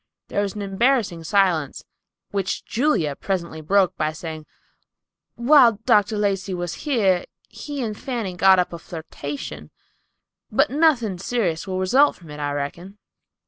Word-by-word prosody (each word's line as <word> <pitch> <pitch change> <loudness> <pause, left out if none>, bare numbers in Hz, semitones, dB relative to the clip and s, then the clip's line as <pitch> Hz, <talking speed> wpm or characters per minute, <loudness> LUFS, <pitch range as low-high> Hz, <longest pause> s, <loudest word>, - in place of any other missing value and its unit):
There 205 - 0
was 200 -1 -3
an 205 - -4
embarrassing 200 -4 +1
silence, 180 -7 +1 0.5
which 195 -2 -2
Julia 225 - 0
presently 170 -2 -3
broke, 190 +3 +2
by 155 0 -1
saying, 155 -1 -7 0.9
"While 245 -1 +6
Dr. 215 -3 +3
Lacey 195 -2 -1
was 175 -1 -4 0.2
here, 195 -9 +2 0.2
he 285 -3 -6
and 215 -2 -3
Fanny 230 -6 -4
got 190 +1 +6
up 180 -1 0
a 170 - -6
flirtation; 145 - -7 0.8
but 275 +7 +2
nothing 260 - +2
serious 190 -6 -1
will 185 -1 -2
result 255 +11 +3
from 165 -4 -14
it, 150 - -8
I 145 -1 -2
reckon." 170 +8 -5
190 Hz, 145 wpm, -22 LUFS, 165-225 Hz, 0.9 s, While